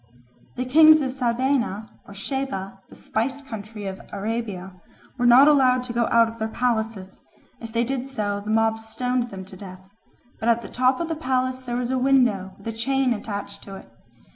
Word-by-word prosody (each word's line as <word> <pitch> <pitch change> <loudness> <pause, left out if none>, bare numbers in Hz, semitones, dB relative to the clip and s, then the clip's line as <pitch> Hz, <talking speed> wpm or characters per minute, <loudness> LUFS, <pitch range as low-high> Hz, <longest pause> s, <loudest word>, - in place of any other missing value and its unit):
The 255 - -2
kings 310 +3 +7
of 265 -2 -1
Sabaea 245 -4 0 0.2
or 200 - -11
Sheba, 200 -5 -4
the - - -14
spice 265 +6 -2
country 215 -4 -8
of 190 0 -5
Arabia, 200 -4 -4 0.4
were 245 - +3
not 255 +4 +8
allowed 255 -4 +4
to 245 -1 -6
go 235 -1 +1
out 230 0 +4
of 225 +1 -9
their 220 - -1
palaces; 220 -5 -2 0.4
if 230 -1 -8
they 230 +1 +1
did 260 +1 -3
so, 210 -6 -2
the 205 +1 -8
mob 225 0 +2
stoned 245 +2 -2
them 190 -2 -8
to 190 - -12
death. 185 0 -12 0.5
But 230 - 0
at 235 0 +2
the - - -8
top 255 +4 +1
of 335 - -2
the 325 - -2
palace 255 -2 -1
there 245 -2 -4
was 245 0 -2
a 260 - +1
window 245 -8 +2
with 200 - -12
a - - -1
chain 265 +2 +1
attached 200 -2 -6
to 195 - -8
it. 115 - -13
235 Hz, 195 wpm, -24 LUFS, 205-255 Hz, 0.5 s, not